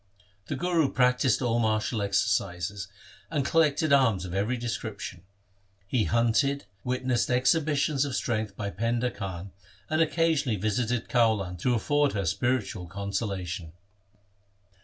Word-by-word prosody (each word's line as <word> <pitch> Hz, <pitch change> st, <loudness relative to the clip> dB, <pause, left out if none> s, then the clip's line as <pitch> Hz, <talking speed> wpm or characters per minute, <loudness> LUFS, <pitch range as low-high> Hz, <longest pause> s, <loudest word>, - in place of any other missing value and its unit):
The -, -, -2 dB
Guru 170 Hz, -5 st, +1 dB
practised 125 Hz, +1 st, +2 dB
all 120 Hz, -1 st, +1 dB
martial 110 Hz, 0 st, 0 dB
exercises 100 Hz, -1 st, 0 dB, 0.4 s
and 145 Hz, -5 st, -1 dB
col 165 Hz, -, +4 dB
lected 150 Hz, -1 st, +2 dB
arms 115 Hz, -10 st, +3 dB
of 90 Hz, -, -6 dB
every 105 Hz, +6 st, 0 dB
description. 105 Hz, -5 st, -5 dB, 0.6 s
He 110 Hz, +2 st, +1 dB
hunted, 120 Hz, +4 st, +2 dB, 0.2 s
witnessed 125 Hz, -1 st, 0 dB
exhibitions 145 Hz, +2 st, +2 dB
of 140 Hz, -3 st, -3 dB
strength 110 Hz, -5 st, -2 dB
by 100 Hz, -1 st, -3 dB
Painda 115 Hz, +3 st, -1 dB
Khan, 95 Hz, -3 st, -6 dB, 0.4 s
and 155 Hz, +1 st, +2 dB
occasionally 160 Hz, -7 st, +2 dB
visited 110 Hz, +4 st, -1 dB
Kaulan 110 Hz, -7 st, +2 dB
to 125 Hz, +6 st, +1 dB
afford 145 Hz, +5 st, +1 dB
her 100 Hz, -2 st, -1 dB
spiritual 100 Hz, 0 st, -1 dB
consolation. 95 Hz, -3 st, -4 dB
115 Hz, 125 wpm, -27 LUFS, 100-130 Hz, 0.6 s, col